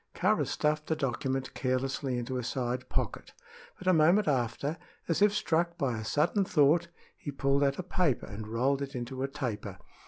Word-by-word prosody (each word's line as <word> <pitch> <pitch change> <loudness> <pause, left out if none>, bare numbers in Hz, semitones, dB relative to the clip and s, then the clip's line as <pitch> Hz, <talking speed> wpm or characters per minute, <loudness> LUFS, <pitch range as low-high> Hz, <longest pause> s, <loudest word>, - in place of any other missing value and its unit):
Kāra - - +2
stuffed 150 0 0
the 160 - +1
document 135 -1 -2
carelessly 130 0 -1
into 125 +1 -2
a - - -4
side 125 +1 -2
pocket; - - -3 0.4
but 185 - -11
a 185 - +6
moment 175 +6 +5
after, 135 +3 0 0.3
as 165 +2 0
if 210 0 +6
struck 170 -4 0
by 135 -7 0
a - - -5
sudden 155 - +2
thought, 165 0 +3 0.3
he - - -7
pulled 140 0 +1
out 140 0 +2
a 185 - -3
paper 175 -7 0
and 105 +2 -7
rolled 130 +5 +1
it 140 0 -5
into 125 +2 -4
a 135 - +1
taper. 105 -8 -4
140 Hz, 185 wpm, -30 LUFS, 125-160 Hz, 0.4 s, a